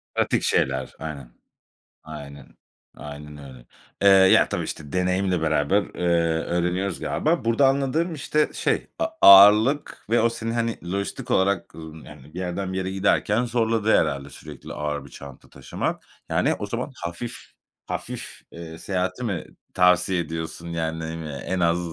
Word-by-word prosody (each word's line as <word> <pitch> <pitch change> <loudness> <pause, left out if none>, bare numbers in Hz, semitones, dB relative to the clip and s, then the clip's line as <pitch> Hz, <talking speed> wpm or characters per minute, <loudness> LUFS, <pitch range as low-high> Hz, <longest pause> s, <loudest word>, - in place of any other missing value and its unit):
Pratik - - +1
şeyler. 65 0 0
Aynen. 70 -6 -7 0.7
Aynen, 70 -3 -11 0.4
aynen 75 0 -9
öyle. 65 -4 -12 0.4
Eee, 100 - +4
ya, 95 -1 +6
tabii, - - -2
işte, 75 +1 -7
deneyimle 90 -1 0
beraber, 80 +5 +2
eee, - - -9 0.4
öğreniyoruz 90 +2 -1
galiba. 160 -4 -1
Burada 125 +4 +4
anladığım, 140 +5 0
işte, 150 +1 0
şey, - - -1
a 325 - +1 0.2
ağırlık 105 +8 +7
ve 115 -1 +3
o 115 - +3
seni, 115 0 -4
hani, 115 -7 -3
lojistik 100 0 -4
olarak, 100 +1 +1
ımm, 80 -1 -10
yani, - - -13
bir 90 - -6
yerden 95 +1 -3
bir - - -3
yere 95 0 -2
giderken 105 +4 +1
zorladı 115 -2 +1
herhâlde 70 0 -1
sürekli - - -10
ağır 75 -2 -4
bir - - -13
çanta 70 -2 -12
taşımak. - - -4 0.3
Yani, - - +2
o - - -3
zaman - - -4
hafif 85 +8 -5 0.5
hafif, - - -6
eee, 80 -1 -9
seyahati 95 +6 -3
mi 95 -8 -3 0.3
tavsiye 90 0 +3
ediyorsun? 80 +1 -5
Yani, 80 -1 -3
ne - - -5
bileyim 80 0 -5
ya, 75 -2 -6
en 95 -1 -3
az, 85 0 +2
90 Hz, 155 wpm, -24 LUFS, 80-105 Hz, 0.7 s, ağırlık